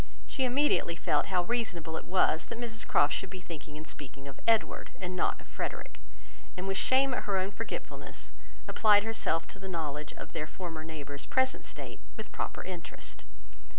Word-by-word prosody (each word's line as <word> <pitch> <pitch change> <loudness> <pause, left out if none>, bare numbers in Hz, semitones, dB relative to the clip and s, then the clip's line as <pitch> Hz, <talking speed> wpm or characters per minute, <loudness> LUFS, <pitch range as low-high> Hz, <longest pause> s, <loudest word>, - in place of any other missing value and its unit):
She 265 - +1
immediately 255 - +3
felt 150 -3 +2
how 180 -2 +3
reasonable 175 -8 -1
it - - -4
was, 180 -3 +4
that - - -4
Mrs 225 -2 -2
Croft 145 +1 +5
should 195 - -1
be 185 0 -6
thinking 155 -4 -7
and 155 - -7
speaking 140 -2 -7
of 135 - -8
Edward, 225 -1 +3
and 185 0 -3
not - - +2
of - - -12
Frederick; - - -4 0.6
and 185 +1 -3
with 195 - +1
shame 265 0 +5
at - - -1
her 195 -2 +2
own 190 +1 +1
forgetfulness 230 +3 -5 0.4
applied 210 -2 +6
herself 215 -7 +1
to 195 - -8
the 190 0 -5
knowledge 150 -4 -2
of - - -8
their 155 - -2
former 165 -2 -5
neighbour's 145 -3 -6
present 260 0 +2
state - - -7 0.2
with - - -6
proper - - -2
interest. 180 -3 -7
180 Hz, 185 wpm, -32 LUFS, 160-220 Hz, 0.6 s, applied